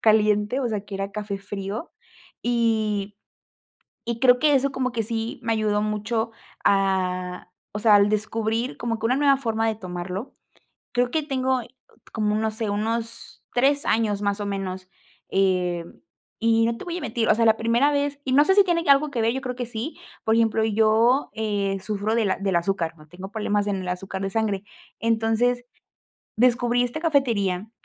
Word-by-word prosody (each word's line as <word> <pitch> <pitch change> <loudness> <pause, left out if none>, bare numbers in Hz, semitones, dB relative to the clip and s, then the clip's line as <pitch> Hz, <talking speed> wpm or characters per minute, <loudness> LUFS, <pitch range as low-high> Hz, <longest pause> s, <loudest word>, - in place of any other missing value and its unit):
caliente, 215 +1 +3
o 245 - 0
sea, 210 -2 -3
que 205 - -7
era 195 +1 -4
café 210 -1 -4
frío 200 - -6 0.5
y 220 -4 0 0.9
y 235 0 -3
creo 250 -1 +5
que 300 -2 +4
eso 275 +1 +2
como 260 -1 -1
que 230 -2 -1
sí 225 +1 -3
me 230 - -1
ayudó 210 -1 +1
mucho 220 +2 -1 0.3
a, 185 -2 0 0.2
o - - -3
sea, 215 -1 +5
al 200 0 +5
descubrir 220 +3 -1
como 230 -1 -2
que 225 - -3
una 250 +3 +3
nueva 280 -1 +4
forma 225 -3 -1
de 220 - 0
tomarlo, 185 +3 -6 0.6
creo 245 0 +1
que 315 +1 0
tengo 260 -2 0 0.5
como 210 -2 0
un, 215 - 0
no 220 0 0
sé, 220 -1 -3
unos 230 +2 -3
3 280 +3 +2
años 210 -3 +1
más 200 0 -1
o - - -2
menos, 190 -2 -4 0.4
eh, 180 -3 +1 0.5
y 225 0 +3
no 230 0 0
te - - -8
voy 350 0 -3
a - - -6
mentir, 225 -4 -1
o 215 - +6
sea, 230 0 +2
la 220 - +6
primera 235 +6 +2
vez, 285 0 -1
y 255 - 0
no 285 +2 +7
sé 385 - +4
si 405 - +7
tiene 340 -2 +1
algo 280 +2 +5
que 240 -4 -1
ver, 225 +1 +2
yo 265 - -2
creo 250 -2 -4
que 250 0 -3
sí, 240 +6 -5 0.3
por 220 0 +3
ejemplo, 225 -1 +2
yo, 225 +5 +3
eh, 200 -3 -1
sufro 210 +2 -2
de 215 -5 +2
del 195 -2 0
azúcar, 170 -2 -1
¿no?, 155 0 -17
tengo 185 +4 -10
problemas 210 -2 0
en 200 -1 0
el 185 - -6
azúcar 190 +1 -4
de 195 - -1
sangre, 205 -2 -1 0.4
entonces, 230 +2 +1 0.7
descubrí 245 0 +3
esta 245 +5 -3
cafetería 220 - +1
220 Hz, 185 wpm, -24 LUFS, 200-245 Hz, 0.9 s, no